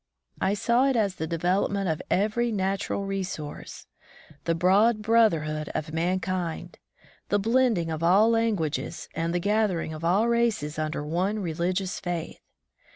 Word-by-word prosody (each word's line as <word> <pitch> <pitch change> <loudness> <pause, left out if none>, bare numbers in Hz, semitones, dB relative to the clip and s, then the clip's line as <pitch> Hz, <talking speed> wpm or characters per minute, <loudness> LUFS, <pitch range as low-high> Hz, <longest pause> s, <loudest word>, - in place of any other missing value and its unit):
I 200 - +2
saw 235 +5 +2
it 270 - +1
as 200 -5 0
the 160 - -3
development 185 +4 0
of 160 -2 -1
every 220 +5 +1
natural 195 0 -1
re 195 0 -2
source; 155 -5 -7 0.6
the 165 - +1
broad 205 +6 +3
brotherhood 165 -10 +2
of 155 0 -3
mankind; 175 0 -2 0.5
the 205 - +3
blending 225 -5 +2
of 160 0 -4
all 195 +7 +5
languages 175 -8 -1
and 165 +1 -2
the 175 - 0
gather 205 -1 +1
ing 160 - -4
of 155 +1 -8
all 190 +7 +3
races 230 -11 0
under 155 -1 -2
one 185 +7 -1
religious 180 +1 -2
faith. 175 -3 -5
185 Hz, 150 wpm, -26 LUFS, 165-215 Hz, 0.6 s, all